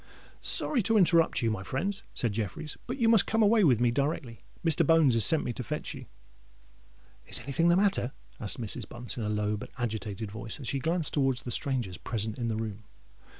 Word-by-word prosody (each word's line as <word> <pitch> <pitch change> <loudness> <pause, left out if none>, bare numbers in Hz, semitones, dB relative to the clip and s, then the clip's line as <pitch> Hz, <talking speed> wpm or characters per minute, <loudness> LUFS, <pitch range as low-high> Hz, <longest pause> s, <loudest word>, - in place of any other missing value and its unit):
"Sorry 265 -6 +6
to 225 +2 +2
interrupt 170 -8 +3
you, 115 - +2
my 105 -3 -3
friends," 190 - -3
said 115 -4 -1
Jeffreys; 110 - -4
"but 250 +3 -4
you 235 -4 +2
must 225 -3 +4
come 225 0 +2
away 215 +1 +4
with 130 -9 +4
me 120 -1 +2
directly. 140 -2 -2 0.2
Mr. 165 0 +3
Bones 160 -4 +4
has 115 -1 +4
sent 160 -3 +3
me 120 - -3
to 125 - -6
fetch - - -5
you——" - - -10 1.2
"Is - - -3
anything 140 +7 0
the 170 - +5
matter?" 195 -10 +1 0.3
asked - - -3
Mrs. 115 0 -4
Bunce, 120 0 -5
in - - -3
a 105 - -2
low 105 0 -1
but - - -9
agitated 110 -3 -4
voice, 110 +3 -5
as 130 - -7
she 135 - -1
glanced 165 +3 -1
towards 135 -3 0
the 120 - -5
strangers 120 - 0
present 110 0 -4
in 120 - -2
the 110 - -1
room. 110 -2 -6
125 Hz, 210 wpm, -28 LUFS, 110-165 Hz, 1.2 s, Sorry